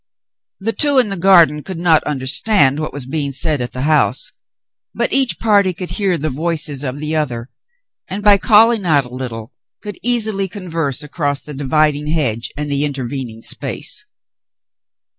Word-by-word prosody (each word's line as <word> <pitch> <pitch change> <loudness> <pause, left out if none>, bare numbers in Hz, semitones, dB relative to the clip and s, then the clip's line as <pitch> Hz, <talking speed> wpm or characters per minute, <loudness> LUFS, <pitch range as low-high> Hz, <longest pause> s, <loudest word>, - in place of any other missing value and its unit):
The 215 +3 -2
two 290 +1 +2
in 245 -5 +3
the 195 - -2
garden 170 -5 +4
could 185 +3 -7
not 165 -2 +3
understand 145 +2 +2
what 155 - -4
was 140 -2 -6
being 140 +1 -2
said 145 +1 +1
at 125 - -4
the 130 - -5
house, 155 - +1 0.6
but - - -1
each 270 -3 +1
party 200 -4 +2
could 180 0 -5
hear 195 -4 0
the 155 0 -2
voices 155 -1 -1
of 135 0 -4
the 155 +1 -2
other, 125 -5 -3 0.6
and 200 +2 -5
by 205 -1 +5
calling 225 0 +4
out 150 -6 +2
a - - -11
little 120 -2 -7 0.3
could 205 -3 -8
easily 220 -5 0
converse 165 -8 -3
across 145 -1 -2
the 150 - -6
dividing 150 +2 0
hedge 130 -8 0
and 150 0 -3
the 140 0 +2
intervening 130 -5 -4
space. - - -1
155 Hz, 165 wpm, -17 LUFS, 140-195 Hz, 0.6 s, by